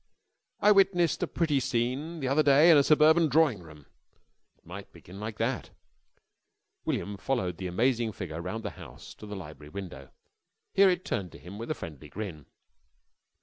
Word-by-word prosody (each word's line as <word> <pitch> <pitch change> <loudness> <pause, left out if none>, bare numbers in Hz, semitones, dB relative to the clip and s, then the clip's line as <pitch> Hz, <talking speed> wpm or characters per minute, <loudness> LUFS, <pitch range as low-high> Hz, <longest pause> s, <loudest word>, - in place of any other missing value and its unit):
"I 210 - +6
witnessed 190 -4 +3
a - - 0
pretty 160 -5 0
scene 130 +7 -2
the 135 - -1
other 140 +4 +3
day 145 +3 +6
in 160 - +7
a - - +7
suburban 155 +3 +5
drawing 145 - +3
room...." 80 -4 -14 0.7
It - - -37
might - - -9
begin 95 +3 -13
like 105 0 -6
that. 120 +2 -2 1.2
William 100 0 -2
followed 95 -9 -2
the 95 - -4
amazing 115 +4 +1
figure 85 -5 -6
round 110 +6 -5
the - - -3
house - - -12
again - - -29
to - - -9
the 105 - -6
library 75 -5 -10
window. 80 -8 -8 0.6
Here 195 0 +6
it 180 0 -1
turned 90 -4 -3
to - - -10
him 95 +5 -11
with 115 - -6
a 155 - -1
friendly 75 -2 -9
grin. 85 -5 -7
115 Hz, 180 wpm, -28 LUFS, -, 1.2 s, in